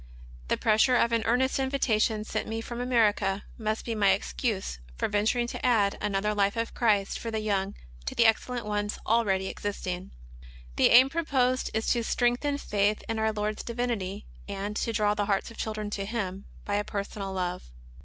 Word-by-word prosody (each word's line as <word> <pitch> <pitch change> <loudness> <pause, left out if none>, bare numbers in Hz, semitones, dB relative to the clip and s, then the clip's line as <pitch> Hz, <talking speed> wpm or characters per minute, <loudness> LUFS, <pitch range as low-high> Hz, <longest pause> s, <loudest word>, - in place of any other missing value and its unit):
The - - +1
pressure 220 +4 +4
of 235 -1 +3
an 230 -1 +2
earnest 260 +4 +2
invitation 230 -5 +1
sent 215 0 -3
me 225 +1 -3
from 235 +1 -5
America 215 -5 +2 0.2
must 220 0 -2
be 230 - -2
mv 200 -3 +4
excuse 200 - -3 0.2
for - - 0
venturing 215 +4 +1
to 235 - -6
add 215 -5 +3
another 210 +1 0
Life 200 +1 +1
of 230 0 -2
Christ 210 -4 +1
for 230 - -4
the 220 -1 -2
Young 200 -2 -1 0.3
to - - -3
the 235 - +4
excellent 235 +1 +1
ones 205 0 -2
already 205 -4 +2
existing. 185 -2 -4 0.7
The - - +5
aim 255 +2 +8
proposed 265 -5 +1
is 220 - 0
to 240 -1 -1
strengthen 245 +5 +1
faith 205 -4 0
in 225 -1 -2
our 220 0 +2
Lord's 210 0 -2
Divinity, 230 -5 -3 0.2
and 200 +1 -4
to 230 - -1
draw 210 -1 +2
the 210 -1 -1
hearts 200 +2 0
of 230 - -13
children 215 -1 -3
to 195 -1 -3
Him 200 -3 -4 0.2
by 205 0 0
a 205 - 0
personal 200 -1 -4
love. 180 - -3
215 Hz, 185 wpm, -28 LUFS, 200-235 Hz, 0.7 s, aim